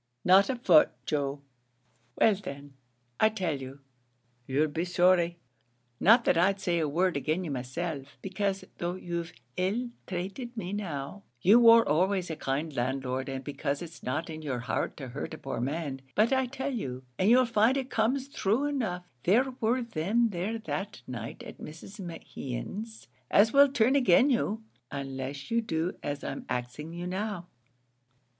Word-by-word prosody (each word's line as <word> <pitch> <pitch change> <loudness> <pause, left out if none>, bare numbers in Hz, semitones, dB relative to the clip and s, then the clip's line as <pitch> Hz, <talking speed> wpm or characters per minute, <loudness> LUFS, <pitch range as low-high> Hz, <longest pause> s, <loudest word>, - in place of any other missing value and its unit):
"Not 190 +2 +6
a 265 - +1
foot, 180 -10 +6 0.2
Joe." 140 -1 -1 0.7
"Well, 220 - +5
then, 140 -7 -8 0.5
I 215 - +6
tell 180 -10 -2
you, 135 +2 -9 0.7
you'll 145 +4 +2
be 160 +3 -2
sorry; 175 -1 +3 0.6
not 230 +4 +6
that 170 - +4
I'd 195 +3 +3
say 175 -3 0
a 155 -2 0
word 175 +2 +1
agin 155 +6 -1
you 165 - -4
myself, 135 +2 -4
becase 195 0 -1 0.2
though 175 +1 -2
you've 170 -2 -4 0.3
ill 220 +7 0 0.2
trated 195 +7 -5
me 185 -2 -4
now, 180 -3 -4 0.2
you 205 - +6
wor 230 -1 +7
always 180 +3 +1
a - - -3
kind 145 +2 -2
landlord, 130 +1 -2
and 135 0 -4
becase 145 +1 -2
it's 165 -1 -10
not 145 +6 -2
in 155 0 -7
your 135 -5 -3
heart 125 - -2
to 135 -4 -7
hurt 135 +4 -5
a - - -11
poor 135 - -4
man; 140 0 -3
but 220 +5 +4
I 265 -1 +2
tell 270 +2 -3
you, 130 - -4 0.2
and 185 - +4
you'll 255 +2 +6
find 235 +3 +3
it 265 -1 -3
comes 255 +5 +1
thrue 235 0 0
enough, 225 -12 -2 0.2
there 245 - +3
were 240 +3 +2
them 230 +3 +1
there 200 +4 -2
that 195 - -5
night 115 -3 -6
at - - -10
Mrs. 165 +7 -10
Mehan's 185 - -6 0.2
as 215 +2 +5
will 280 0 +7
turn 255 0 +3
agin 255 +1 +5
you, 225 -2 0 0.3
unless 135 - -5
you 230 0 +3
do 170 -4 -2
as 145 -1 -4
I'm - - -5
axing 125 +5 -4
you 175 +1 -5
now." 190 0 -3
180 Hz, 165 wpm, -29 LUFS, 145-220 Hz, 0.7 s, wor